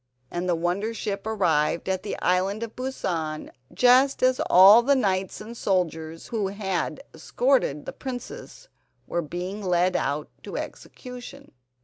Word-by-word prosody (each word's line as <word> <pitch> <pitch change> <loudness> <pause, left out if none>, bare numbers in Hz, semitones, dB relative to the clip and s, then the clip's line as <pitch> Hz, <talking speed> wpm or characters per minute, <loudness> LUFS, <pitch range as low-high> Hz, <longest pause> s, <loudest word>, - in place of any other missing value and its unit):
And 175 +1 -2
the 175 - +3
wonder 185 +7 -1
ship 200 -1 -4
arrived 170 -7 +1
at 190 -1 -1
the 205 - -5
Island 190 +4 +1
of 225 -1 -7
Busan 170 -12 -3 0.2
just 250 +9 +4
as 255 0 +3
all 195 +6 +9
the 280 +4 +3
knights 190 -6 0
and 225 +3 -9
soldiers 165 -6 -2
who 215 -4 -1
had 190 -5 -3
escorted 160 - 0
the - - -6
princess 260 - -8 0.4
were 170 - -2
being 180 +6 -5
led 180 0 +2
out 145 0 -1
to - - -7
execution. 250 +2 -9
190 Hz, 140 wpm, -25 LUFS, 175-235 Hz, 0.4 s, all